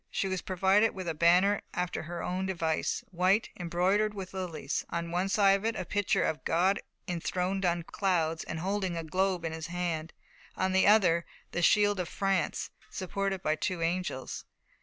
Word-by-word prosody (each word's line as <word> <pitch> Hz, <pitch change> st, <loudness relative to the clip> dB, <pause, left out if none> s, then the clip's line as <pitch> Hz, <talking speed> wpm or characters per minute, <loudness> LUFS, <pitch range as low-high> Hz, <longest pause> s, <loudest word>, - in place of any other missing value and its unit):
She 195 Hz, -, -1 dB
was 190 Hz, -1 st, -2 dB
provided 190 Hz, +4 st, +2 dB
with 185 Hz, -2 st, -5 dB
a 165 Hz, -, 0 dB
banner 180 Hz, +6 st, +4 dB
after 180 Hz, 0 st, -2 dB
her 170 Hz, +1 st, -6 dB
own 185 Hz, +1 st, -2 dB
device 165 Hz, -4 st, -1 dB
white, 185 Hz, +4 st, +2 dB
embroidered 185 Hz, +5 st, +1 dB
with 190 Hz, -2 st, -7 dB
lilies: 170 Hz, -6 st, -3 dB
on 170 Hz, 0 st, -3 dB
one 180 Hz, +3 st, 0 dB
side 195 Hz, 0 st, +5 dB
of 200 Hz, -, -10 dB
it, 225 Hz, 0 st, 0 dB
a 185 Hz, -, -3 dB
picture 205 Hz, 0 st, +1 dB
of 155 Hz, -, -1 dB
God 185 Hz, +5 st, +2 dB, 0.3 s
enthroned 180 Hz, +2 st, -1 dB
on 175 Hz, -1 st, +1 dB
clouds 165 Hz, -3 st, 0 dB
and 160 Hz, -, -5 dB
holding 190 Hz, -2 st, -1 dB
a 165 Hz, -, -3 dB
globe 185 Hz, +1 st, 0 dB
in 165 Hz, -, -2 dB
His 160 Hz, 0 st, -5 dB
hand; 170 Hz, -2 st, -3 dB, 0.5 s
on 185 Hz, 0 st, +1 dB
the 190 Hz, +1 st, +4 dB
other, 180 Hz, -6 st, +4 dB, 0.2 s
the 175 Hz, -, -2 dB
shield 205 Hz, +2 st, +4 dB
of 180 Hz, -, -2 dB
France, 195 Hz, -5 st, -1 dB, 0.2 s
supported 195 Hz, 0 st, -3 dB
by 155 Hz, -, +2 dB
two 170 Hz, +2 st, -2 dB
angels. 170 Hz, -6 st, -2 dB
180 Hz, 180 wpm, -30 LUFS, 170-195 Hz, 0.5 s, side